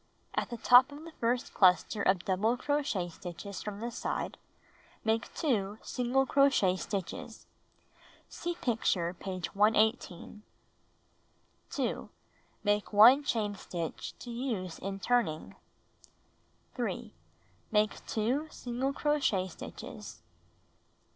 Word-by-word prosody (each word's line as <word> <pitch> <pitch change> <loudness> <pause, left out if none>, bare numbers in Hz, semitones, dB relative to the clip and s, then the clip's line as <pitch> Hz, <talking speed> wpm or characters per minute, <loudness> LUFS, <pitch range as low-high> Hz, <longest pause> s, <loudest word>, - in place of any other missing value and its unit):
At - - -1
the 240 - -5
top 245 +5 +7
of 290 +2 -9
the 330 - -9
first 240 +1 0
chister 190 +2 +4
of 190 -3 +2
double 210 +6 +1
crochet 285 -11 -1
stitches 180 +3 -7
from 210 0 -6
the 235 +1 -3
side, - - -3 0.6
make 225 +1 0
2 215 -9 0
single 255 +2 +1
crochet 265 -10 +4
stitches. 190 -1 -5 0.8
(See 345 0 -4
picture, 200 - 0
page 185 -1 -5
118.) 215 -1 +1 1.3
2. - - -2 0.5
Make 205 0 +1
1 235 +7 +8
chain 215 -6 0
stitch 175 -4 -5
to 240 - -8
use 230 -8 -3
in 195 +1 -4
turning. 185 - 0 1.2
3. - - -4 0.6
Make 215 0 +1
2 250 +8 0
single 255 +2 -3
crochet 275 -12 +1
stitches. 180 - -9
220 Hz, 110 wpm, -31 LUFS, 190-250 Hz, 1.3 s, 1